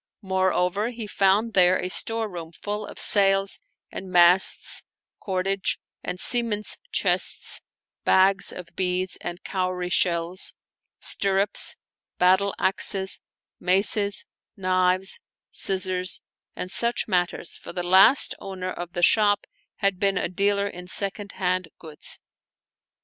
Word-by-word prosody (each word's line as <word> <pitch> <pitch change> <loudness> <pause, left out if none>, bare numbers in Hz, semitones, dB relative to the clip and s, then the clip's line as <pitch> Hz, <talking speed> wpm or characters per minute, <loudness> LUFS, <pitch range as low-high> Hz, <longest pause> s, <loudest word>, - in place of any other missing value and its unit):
Moreover^ 190 +3 0
he 230 -2 -7
found 205 +3 +1
there 185 -1 +4
a - - -3
storeroom 185 -5 +2
full 210 +3 -5
of - - -11
sails 195 -1 +3 0.3
and 190 - -7
masts, 180 +1 +4 0.4
cordage, 195 0 -2 0.3
and 180 0 -5
seaman's 230 -3 +1
chests, - - +2 0.4
bags 190 +1 +4
of 180 -2 -9
beads 185 0 -1
and 175 +2 -7
cowrie 185 -2 -3
shells, 175 +1 -1 0.4
stirrups, 195 +1 +2 0.4
battle 190 +2 +3
axes, 190 0 +1 0.4
maces, 200 +2 +3 0.3
knives, 185 0 +1 0.3
scissors, 185 -1 -1 0.3
and 180 - -6
such 235 +2 +1
mat 180 -4 +1
ters, 175 - -5
for - - -10
the 180 0 -4
last 190 +9 +5
owner 185 -1 -6
of 175 0 -8
the 175 -1 -3
shop 205 +1 +3 0.3
had 195 -3 -1
been 195 -1 +1
a - - -1
dealer 200 +2 0
in 180 -2 -9
second 200 +1 -3
hand 185 -1 -1
goods. 155 -2 -4
190 Hz, 120 wpm, -24 LUFS, 180-200 Hz, 0.4 s, last